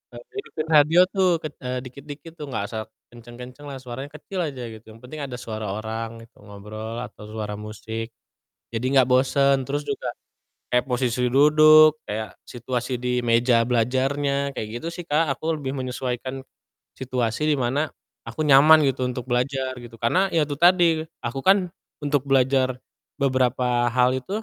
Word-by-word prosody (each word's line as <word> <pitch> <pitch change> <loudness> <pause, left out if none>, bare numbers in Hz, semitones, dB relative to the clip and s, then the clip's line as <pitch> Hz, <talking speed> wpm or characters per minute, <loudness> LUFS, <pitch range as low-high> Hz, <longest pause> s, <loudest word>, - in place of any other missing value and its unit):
eee, - - -8 0.2
ngikutin 160 - -5
radio 155 +3 +6
tuh 190 -2 +2
ket 155 -2 -5
eee, 125 -1 -3
dikit-dikit 145 +4 -10
tuh, 150 - -5
gak 105 - -2
usah 110 -1 -3 0.3
kenceng-kencenglah, 125 +4 -10
suaranya 130 +2 -6
kecil 185 +5 -6
aja 135 -4 -7
gitu, 110 0 -12
yang 110 - -15
penting 150 +5 -9
ada 130 -3 -5
suara 110 -2 -5
orang 110 +2 -5
gitu 115 - -21
ngobrol, 110 +3 -7
atau 105 -3 -10
suara 105 -1 -5
musik, 110 +2 -6 0.6
jadi 115 +2 -2 0.2
gak 125 - 0
bosen. 135 +2 +3
Terus 145 +3 -3
juga 130 - -3 0.6
kayak 125 0 +2
posisi 125 -1 0
duduk, 155 +3 +6
kayak 110 +1 -5
situasi 125 +1 -3
di 125 0 -1
meja 115 0 +4
belajarnya, 135 +4 0
kayak 110 - -4
gitu - - -7
sih 175 - -6
Kak, 155 0 +1
aku 160 +1 -1
lebih 135 -2 -4
menyesuaikan 130 0 -4 0.6
situasi 125 +1 -1
di 150 - +3
mana 135 +5 0 0.4
aku 155 - -3
nyaman 150 +3 +7
gitu 130 -1 0
untuk 125 0 -5
belajar 130 +1 0
gitu, 120 -1 -11
karena 180 - +2
ya 165 - +4
itu 145 - -3
tadi, 175 -2 +4 0.2
aku 120 +2 -3
kan 190 0 +3 0.3
untuk 145 -2 +1
belajar 130 -1 +2 0.4
beberapa 125 -3 +1
hal 125 +1 +3
itu 195 - -5
130 Hz, 160 wpm, -24 LUFS, 120-145 Hz, 0.6 s, nyaman